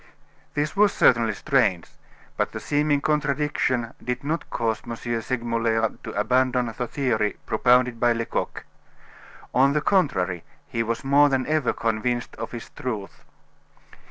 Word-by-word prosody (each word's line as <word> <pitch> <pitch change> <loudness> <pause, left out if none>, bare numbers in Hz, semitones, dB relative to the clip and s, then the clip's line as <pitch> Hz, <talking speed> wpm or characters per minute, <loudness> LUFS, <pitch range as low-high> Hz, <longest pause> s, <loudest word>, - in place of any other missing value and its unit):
This 150 +3 -1
was 205 0 +5
certainly 115 -3 +3
strange, 110 - +1 0.5
but - - -1
the - - -4
seeming 145 -1 +1
contradiction 145 -5 0
did 125 +2 -3
not 160 +4 -3
cause 115 -1 -1
M. 120 -1 -5
Segmuller 115 -1 -1
to - - -6
abandon 125 +1 +1
the 125 - -3
theory 115 -7 0
propounded 125 +1 +3
by 120 0 +3
Lecoq. 115 0 -3 0.9
On 135 +2 +4
the 150 - +1
contrary, 95 - +1 0.2
he 115 - -2
was 115 +2 -2
more 145 +2 +5
than 130 -1 0
ever 155 -4 +1
convinced 115 +2 -2
of - - -5
its 115 - -8
truth. 110 -6 -6
125 Hz, 135 wpm, -24 LUFS, 115-140 Hz, 0.9 s, was